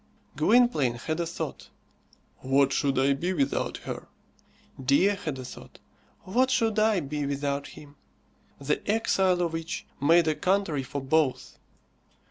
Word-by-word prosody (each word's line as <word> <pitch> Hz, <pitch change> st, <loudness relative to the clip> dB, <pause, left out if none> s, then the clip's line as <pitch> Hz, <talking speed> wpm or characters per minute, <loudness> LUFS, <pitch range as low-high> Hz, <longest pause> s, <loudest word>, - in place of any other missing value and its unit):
Gwynplaine 155 Hz, -, +3 dB
had 155 Hz, +7 st, -4 dB
a 170 Hz, -, -1 dB
thought 170 Hz, -, -6 dB, 0.7 s
"What 135 Hz, +1 st, +2 dB
should 140 Hz, -1 st, 0 dB
I 135 Hz, +1 st, +3 dB
be 175 Hz, +7 st, -2 dB
without 140 Hz, -5 st, -1 dB
her?" -, -, -6 dB, 0.8 s
Dea 140 Hz, +9 st, +4 dB
had 155 Hz, -8 st, -5 dB
a 130 Hz, -, -7 dB
thought -, -, -11 dB, 0.5 s
"What 250 Hz, +7 st, +1 dB
should 225 Hz, -5 st, +1 dB
I 215 Hz, -3 st, +3 dB
be 145 Hz, 0 st, -3 dB
without 140 Hz, 0 st, -2 dB
him?" 145 Hz, -1 st, -14 dB, 0.6 s
The 140 Hz, +1 st, -1 dB
exile 190 Hz, -4 st, +2 dB
of 165 Hz, -1 st, -2 dB
each 165 Hz, 0 st, -5 dB, 0.2 s
made 165 Hz, +3 st, +4 dB
a 155 Hz, -, +3 dB
country 180 Hz, -4 st, 0 dB
for 140 Hz, +2 st, -5 dB
both. 135 Hz, 0 st, 0 dB
155 Hz, 140 wpm, -27 LUFS, 140-185 Hz, 0.8 s, Dea